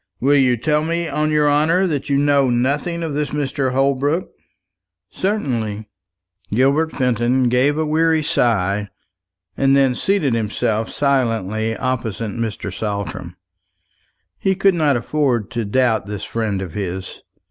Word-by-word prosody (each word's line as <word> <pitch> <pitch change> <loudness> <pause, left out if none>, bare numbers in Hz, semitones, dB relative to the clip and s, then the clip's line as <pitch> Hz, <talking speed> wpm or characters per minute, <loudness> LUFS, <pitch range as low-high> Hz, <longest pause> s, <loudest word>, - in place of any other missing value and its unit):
"Will 140 +3 +3
you 130 -3 +3
tell 150 +5 +1
me, 170 +1 -1
on 155 0 -1
your 150 -1 +2
honour, 155 +6 +3
that 145 -6 -2
you 140 - +2
know 140 -2 +3
nothing 145 +8 0
of 160 -3 -3
this 150 0 -1
Mr. 140 -2 -1
Holbrook?" 140 +5 0 0.8
"Certainly." 115 - -2 0.6
Gilbert 140 +8 +2
Fenton 125 0 +1
gave 130 +5 +2
a 160 - 0
weary 160 +1 +2
sigh, 105 - +1 0.7
and 135 +4 +3
then 135 -2 +3
seated 155 -2 0
himself 110 0 -1
silently 115 -6 0
opposite 115 -4 -3
Mr. 110 -3 -4
Saltram. 100 -4 -4 1.0
He 190 0 +1
could 195 0 +3
not 150 -6 +2
afford 125 -5 -1
to 115 -2 -2
doubt 110 -1 +1
this 105 -1 -5
friend 105 -4 -2
of 90 -4 -8
his. 95 -2 -5
130 Hz, 135 wpm, -19 LUFS, 110-150 Hz, 1.0 s, Will